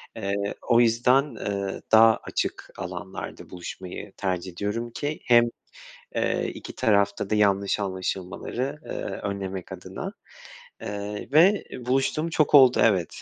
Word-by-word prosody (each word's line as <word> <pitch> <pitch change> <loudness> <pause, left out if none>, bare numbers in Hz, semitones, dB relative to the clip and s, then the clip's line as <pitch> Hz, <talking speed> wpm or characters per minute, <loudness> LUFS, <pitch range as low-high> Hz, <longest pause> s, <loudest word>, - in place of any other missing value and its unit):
Eee, 100 -1 -2 0.2
o 120 - +6
yüzden, 125 +3 +3
eee, 100 -2 -3
daha 110 0 +7
açık - - -3
alanlarda - - -7
buluşmayı 90 0 -8
tercih 95 -1 -2
ediyorum 105 +6 -3
ki 145 +5 -3
hem, 120 -1 +6 0.7
eee - - 0
2 - - -9
tarafta 100 -2 +2
da 110 - +2
yanlış 100 -1 +2
anlaşılmaları, 95 +8 -3
eee, - - -11 0.4
önlemek 95 -2 -5
adına, - - -7 0.7
eee, 105 0 -5
ve 180 +7 +5 0.2
buluştuğum 135 +5 +1
çok 155 -2 +1
oldu, 130 -3 +7
evet. 95 -7 +1
105 Hz, 125 wpm, -25 LUFS, 100-125 Hz, 0.7 s, daha